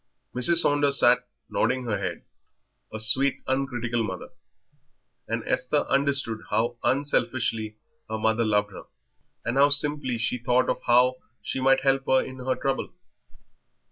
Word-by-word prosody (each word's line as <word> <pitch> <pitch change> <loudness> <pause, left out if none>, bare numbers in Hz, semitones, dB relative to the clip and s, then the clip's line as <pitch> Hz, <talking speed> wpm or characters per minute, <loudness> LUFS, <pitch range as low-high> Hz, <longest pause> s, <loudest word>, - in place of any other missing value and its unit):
Mrs. 165 +7 +3
Saunders 145 -1 +2
sat 125 +1 +3 0.2
nodding 130 0 -1
her 110 -3 -2
head, - - -5 0.7
a 110 - -6
sweet, 130 +5 +3
uncritical 120 -3 -2
mother; 95 -4 -6 1.0
and - - -3
Esther 145 +3 0
understood 140 -5 0
how 115 +2 -1
unselfishly 120 -6 -1 0.3
her 110 - -3
mother 110 +1 0
loved 105 -2 0
her, 95 - -11 0.6
and 120 +3 -2
how 140 +1 +5
simply 145 -3 +3
she 115 +2 -2
thought 125 +2 +1
of - - -5
how 125 +1 +4 0.3
she - - -4
might 135 0 +3
help 135 0 +1
her 130 - +4
in 130 0 -6
her 130 0 -2
trouble. 135 -1 -3
125 Hz, 140 wpm, -25 LUFS, 115-135 Hz, 1.0 s, how